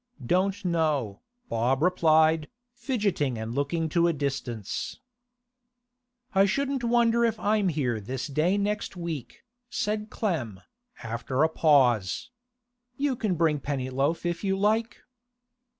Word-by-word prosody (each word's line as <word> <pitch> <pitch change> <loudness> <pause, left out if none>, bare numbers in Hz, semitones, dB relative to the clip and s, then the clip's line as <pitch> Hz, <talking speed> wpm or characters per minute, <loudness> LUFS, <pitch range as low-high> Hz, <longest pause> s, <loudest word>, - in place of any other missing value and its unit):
'Don't 185 +7 +1
know,' 155 - 0 0.3
Bob 125 +5 +1
replied, 160 -3 +3 0.2
fidgeting 210 - -1
and 110 +1 -4
looking 145 +5 -1
to 170 +2 +2
a 170 - +2
distance. 135 -7 -4 1.3
'I 195 0 +5
shouldn't 275 +4 -1
wonder 235 0 +3
if 225 -2 +1
I'm 210 -2 +2
here 130 -8 -1
this 125 +5 -4
day 155 +7 +1
next 205 -1 -2
week,' 170 -7 -6 0.3
said 215 -2 -2
Clem, 140 - -2 0.4
after 120 +5 -1
a 160 - +4
pause. 130 - +2 0.7
'You 275 -2 0
can 210 -6 -1
bring 160 -3 +2
Pennyloaf 140 +4 -1
if 175 +1 -2
you 195 -1 +1
like. 220 +3 0
165 Hz, 120 wpm, -27 LUFS, 135-205 Hz, 1.3 s, I